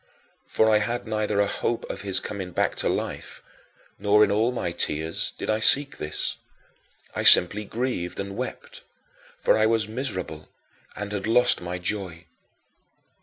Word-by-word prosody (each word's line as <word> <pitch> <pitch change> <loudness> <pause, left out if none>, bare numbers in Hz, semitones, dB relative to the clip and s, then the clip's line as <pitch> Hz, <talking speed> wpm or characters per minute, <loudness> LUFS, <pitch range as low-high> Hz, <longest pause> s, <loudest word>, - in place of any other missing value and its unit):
For 110 - +2
I 110 -1 +4
had 120 +3 -3
neither 110 -2 -1
a 100 - +4
hope 115 +3 -3
of - - -6
his 100 -2 0
coming 95 -3 -6
back - - 0
to - - 0
life, - - -5 0.6
nor 105 +1 +4
in 100 - +2
all 110 +4 +2
my 115 -8 -3
tears 80 +3 -2
did - - -5
I 110 0 +1
seek 140 +6 +4
this. 75 0 -2 0.8
I - - -1
simply 105 +4 +6
grieved 110 -6 -3
and 100 0 -5
wept, 485 - -7 0.6
for - - +4
I 110 0 +3
was 110 -2 +1
miserable 110 - -5 0.5
and 105 +1 -6
had 105 0 -3
lost 120 -1 +3
my 90 +1 -4
joy. 90 -2 -4
105 Hz, 160 wpm, -25 LUFS, 95-115 Hz, 0.8 s, simply